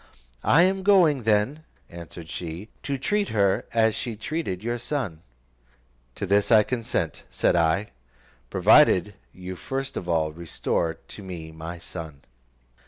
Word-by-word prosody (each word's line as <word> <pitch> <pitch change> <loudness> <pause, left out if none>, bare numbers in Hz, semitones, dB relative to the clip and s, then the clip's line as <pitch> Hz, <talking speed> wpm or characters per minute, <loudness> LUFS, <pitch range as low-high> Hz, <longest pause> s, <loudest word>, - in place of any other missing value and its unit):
"I 165 +4 +5
am 190 +1 +2
going 180 -9 +5
then," 110 +9 +1 0.2
answered 85 -1 -10
she, 85 +4 -6
"to 140 -1 -2
treat 205 +9 0
her 100 -3 +2
as 110 -1 +3
she 120 0 -4
treated 110 - -4
your 120 +1 -2
son." 115 - -3 0.9
"To - - -3
this 100 +3 +2
I 110 -2 +7
consent," 115 - -2
said - - +1
I, 85 +5 +1 0.6
"provided 95 +3 +5 0.2
you 90 0 -7
first 135 +7 -4
of 90 - -5
all 80 -2 +1
restore 80 0 -2
to 100 - -12
me 85 -4 -7
my 80 +2 -7
son." 80 -2 -9
100 Hz, 140 wpm, -25 LUFS, 85-125 Hz, 0.9 s, I